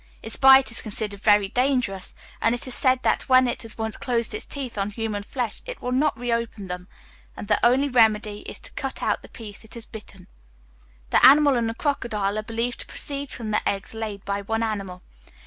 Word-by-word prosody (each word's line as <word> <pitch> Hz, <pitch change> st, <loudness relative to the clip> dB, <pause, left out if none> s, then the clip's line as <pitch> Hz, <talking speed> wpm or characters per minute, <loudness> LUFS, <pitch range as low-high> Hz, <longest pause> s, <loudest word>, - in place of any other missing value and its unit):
Its 225 Hz, -, -4 dB
bite 265 Hz, -2 st, +7 dB
is 230 Hz, -, -1 dB
considered 210 Hz, -2 st, -2 dB
very 205 Hz, -2 st, +4 dB
dangerous, 245 Hz, -5 st, -1 dB, 0.3 s
and 230 Hz, +1 st, +3 dB
it 245 Hz, -, -6 dB
is 255 Hz, -, -2 dB
said 260 Hz, 0 st, +4 dB
that, -, -, 0 dB
when 255 Hz, 0 st, +6 dB
it 240 Hz, -, -2 dB
has 225 Hz, -2 st, -6 dB
once 220 Hz, -1 st, -3 dB
closed 240 Hz, -4 st, -1 dB
its -, -, -3 dB
teeth 270 Hz, -4 st, -6 dB
on 200 Hz, 0 st, -1 dB
human 215 Hz, -1 st, -3 dB
flesh, 235 Hz, +2 st, -4 dB
it -, -, -6 dB
will 250 Hz, -, -4 dB
not 275 Hz, 0 st, +1 dB
reopen 230 Hz, -3 st, -2 dB
them, 180 Hz, 0 st, -6 dB, 0.5 s
and 205 Hz, -, -7 dB
the 210 Hz, -, +1 dB
only 260 Hz, +4 st, +4 dB
remedy 215 Hz, -4 st, +3 dB
is -, -, -8 dB
to -, -, -13 dB
cut -, -, -5 dB
out -, -, 0 dB
the -, -, -14 dB
piece 215 Hz, -3 st, -10 dB
it 220 Hz, -, -13 dB
has 235 Hz, -1 st, -9 dB
bitten. 200 Hz, -4 st, -12 dB, 0.9 s
This -, -, +4 dB
animal 285 Hz, +1 st, +8 dB
and 235 Hz, -2 st, 0 dB
the 225 Hz, -, -5 dB
crocodile 215 Hz, -8 st, -1 dB
are -, -, -1 dB
believed 230 Hz, +2 st, -3 dB
to -, -, -8 dB
proceed 280 Hz, -1 st, -3 dB
from 225 Hz, -3 st, -5 dB
the 210 Hz, -, +1 dB
eggs 195 Hz, +2 st, -4 dB
laid 215 Hz, -3 st, -6 dB
by 200 Hz, 0 st, -2 dB
one 225 Hz, +3 st, -1 dB
animal. 195 Hz, -5 st, -4 dB
225 Hz, 215 wpm, -24 LUFS, 210-250 Hz, 0.9 s, animal